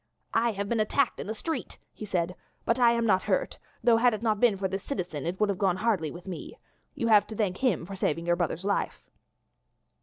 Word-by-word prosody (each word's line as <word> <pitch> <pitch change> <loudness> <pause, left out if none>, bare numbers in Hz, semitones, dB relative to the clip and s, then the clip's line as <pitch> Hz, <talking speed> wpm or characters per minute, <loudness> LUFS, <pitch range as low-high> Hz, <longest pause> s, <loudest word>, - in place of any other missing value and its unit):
"I 230 0 +2
have 200 0 -3
been 230 +1 0
attacked 245 +5 +1
in - - -5
the 220 - -3
street," 315 0 -4 0.2
he 215 - -7
said, 180 -3 -1 0.3
"but 230 +2 +1
I 235 -1 +6
am 235 0 +1
not 190 -4 +3
hurt, - - -1 0.2
though, 235 -1 +5
had 240 -1 +4
it 215 - -8
not 215 -3 +1
been 230 -4 +4
for 190 0 -1
this 195 +1 -4
citizen 170 - -4
it 180 +2 -3
would 210 -1 +2
have 195 -2 -1
gone 190 -3 +2
hardly 200 -8 +1
with 175 +3 -10
me. 185 -3 -7 0.4
You 250 -5 -1
have 210 -2 +6
to 220 - -7
thank 200 -4 0
him 240 -11 +1
for 195 +2 -7
saving 165 -3 -1
your 175 0 +3
brother's 175 +1 -2
life." 200 0 -1
205 Hz, 235 wpm, -28 LUFS, 180-230 Hz, 0.4 s, I